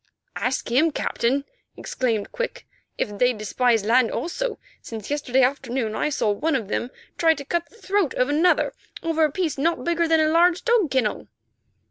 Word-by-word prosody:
"Ask 250 -1 -2
him, 295 +7 +4
Captain," 275 -2 -1 0.3
exclaimed 230 -5 -2
Quick, - - -4 0.3
"if 205 -1 -3
they 250 0 +4
despise 225 +1 +1
land 235 +1 +4
also, 435 - -3 0.2
since 220 +1 -8
yesterday 265 -3 +2
afternoon 250 -3 -1
I 300 - 0
saw 250 -7 0
one 310 +10 0
of 225 -7 -3
them 240 - -2 0.3
try 325 -1 +4
to 280 - -8
cut 340 +3 -2
the - - -22
throat 395 - 0
of 250 - +2
another 315 +5 +2 0.3
over 325 -1 +1
a 305 - +3
piece 320 -4 -2
not 330 +4 0
bigger 340 0 +1
than 320 0 +4
a 310 - +3
large 345 +2 +3
dog 465 -9 +3
kennel." 250 -5 -1
280 Hz, 175 wpm, -23 LUFS, 245-335 Hz, 0.3 s, him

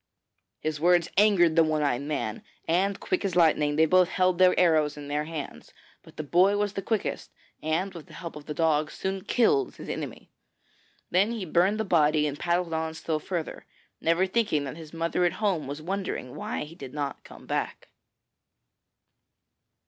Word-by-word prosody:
His 155 -1 -2
words 175 +1 +3
angered 190 -5 +4
the 165 - +6
one 155 -1 0
eyed 135 -3 0
man, 140 -7 -3 0.3
and, 190 +4 +1
quick 185 - -1
as 190 -3 -2
lightning, 155 -4 +3
they 160 +1 +5
both 180 +2 +4
held 185 -2 +1
their 185 -1 +5
arrows 155 -4 +3
in 145 -1 -8
their 150 +1 -1
hands; 155 -3 -7 0.3
but - - -18
the 155 - -3
boy 185 +7 +3
was 205 -1 -1
the 195 - -3
quickest, 215 +1 -2 0.3
and 170 +5 -1
with 170 -4 -10
the - - -15
help 170 -4 -7
of 150 -1 -10
the 150 - -3
dog, 155 -1 +2
soon 190 0 -4
killed 375 - +2
his - - -9
enemy. - - -6 0.8
Then 195 +5 +3
he 220 -5 -4
burned 180 +6 +2
the 220 - 0
body, 155 -4 +3
and 145 -1 -3
paddled 175 -1 0
on 160 0 -2
still 160 -1 -2
further, 170 0 -5 0.3
never 165 +3 +2
thinking 190 -7 0
that 135 0 -6
his 160 -2 -11
mother 165 +2 -1
at 175 - +2
home 190 -9 -1
was 145 +2 -6
wondering 185 -8 -4
why - - -4
he 150 +2 -10
did 135 -4 -10
not 145 -2 -4
come - - -14
back. - - -3
165 Hz, 185 wpm, -27 LUFS, 150-185 Hz, 0.8 s, the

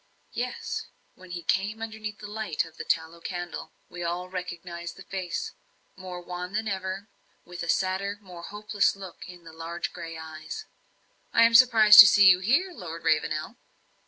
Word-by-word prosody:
Yes; 250 +1 -4 0.3
when 185 0 -16
he 175 -1 -6
came 200 +6 0
underneath 215 -1 -6
the 210 - -10
light 205 -7 -2
of 165 - -16
the - - -5
one - - -25
tallow 165 +1 -1
candle, 175 0 -6 0.2
we 175 - -9
all 175 +1 -3
recognized 175 -1 -6
the - - -11
face 185 -3 -4 0.4
more 185 -1 -8
wan 180 +1 -7
than 220 +1 -1
ever 190 0 -4 0.4
with 175 0 -8
a 165 - -5
sadder 190 +2 0
and 205 - -19
more 180 -3 -11
hopeless 210 +2 0
look 190 -3 -10
in 175 -1 -12
the 165 -1 -12
large 165 +1 -5
grey 165 -1 -7
eyes. 155 0 -8 0.7
"I 230 - +5
am 230 0 +5
surprised 225 -3 +8
to 210 - +14
see 200 -1 +6
you 180 - +3
here, 280 - +2
Lord 170 - -8
Ravenel." 155 -1 0
185 Hz, 180 wpm, -27 LUFS, 170-210 Hz, 0.7 s, to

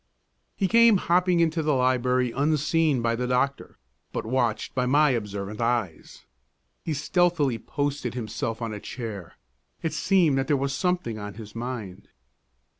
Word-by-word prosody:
He 195 - 0
came 230 +1 +6
hopping 180 0 +2
into 165 0 +1
the 150 -2 +1
library, 125 -1 +2
unseen 150 0 +1
by 115 0 +1
the 125 +1 -2
doctor, 130 +2 -1 0.3
but - - -4
watched 120 -2 -1
by 125 -1 0
my 145 +2 +4
observant 105 -2 -4
eyes. 115 -8 -2 0.6
He 160 - -2
stealthily 150 -4 +1
posted 145 -2 -3
himself 115 0 -4
on 115 -1 -3
a 105 - -6
chair; 105 -7 -7 0.5
it 165 - -1
seemed 160 -3 +3
that 135 - -1
there 145 - +2
was 135 0 -1
something 180 - -1
on 105 -1 -7
his 105 -1 -10
mind. 115 -5 -6
130 Hz, 150 wpm, -26 LUFS, 115-155 Hz, 0.6 s, came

